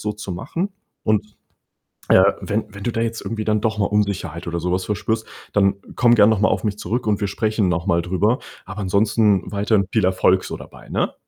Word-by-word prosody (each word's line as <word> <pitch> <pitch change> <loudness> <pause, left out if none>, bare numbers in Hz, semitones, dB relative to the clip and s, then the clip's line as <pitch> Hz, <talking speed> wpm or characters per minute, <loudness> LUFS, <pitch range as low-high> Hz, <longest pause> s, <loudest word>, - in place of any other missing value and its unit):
so 105 - -2
zu 105 -3 -6
machen. 170 - -3 0.3
Und, 105 0 0 0.7
äh, - - +7 0.2
wenn 110 +2 -1
wenn 100 0 -8
du 120 - 0
da 115 - -2
jetzt 115 0 -2
irgendwie 110 -1 -4
dann 105 -1 +1
doch 110 0 0
mal 100 - +1
Unsicherheit 100 -5 -1
oder 85 0 -2
so 90 +2 -2
was 90 0 0
verspürst, 110 +2 -2 0.3
dann 100 -1 +3 0.2
komm 120 -1 +5
gern 105 -1 +6
noch 110 - +1
mal 105 - +4
auf - - -1
mich 105 -1 -2
zurück 120 +1 -2
und 105 -1 0
wir 100 - +1
sprechen 110 0 0
noch 85 0 -1
mal 85 -3 +2
drüber. 95 +7 +1 0.3
Aber 105 +1 -6
ansonsten 100 0 +2
weiterhin 100 0 +1
viel 110 - +2
Erfolg 95 0 +3
so - - -5
dabei, - - -13
ne? - - -1
105 Hz, 220 wpm, -21 LUFS, 95-110 Hz, 0.7 s, äh